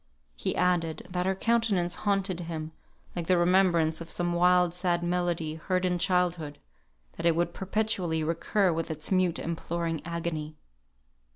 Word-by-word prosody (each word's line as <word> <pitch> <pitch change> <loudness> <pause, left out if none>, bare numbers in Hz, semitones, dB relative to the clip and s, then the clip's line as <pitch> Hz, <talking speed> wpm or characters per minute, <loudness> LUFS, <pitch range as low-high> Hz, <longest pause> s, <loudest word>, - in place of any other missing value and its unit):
He - - -2
added, 170 -3 +1
that 180 0 -1
her 190 - +1
countenance 205 -5 +1 0.2
haunted 195 -3 0
him, 160 -2 -5 0.4
like 170 -2 -3
the 185 - +4
remembrance 175 -3 +3
of 165 - -8
some 175 0 0
wild 180 0 +4
sad 175 -1 0
melody, 175 -3 -1
heard 180 +3 -1
in 180 -1 0
childhood; 175 -5 0 0.6
that - - -4
it 165 - +4
would 175 +1 0
perpetually 190 -5 -1
recur 175 +4 +1
with 165 0 -3
its 155 +2 -4
mute 185 -2 +2
imploring 165 -1 -3
agony. 165 -2 -4
175 Hz, 150 wpm, -28 LUFS, 165-180 Hz, 0.6 s, the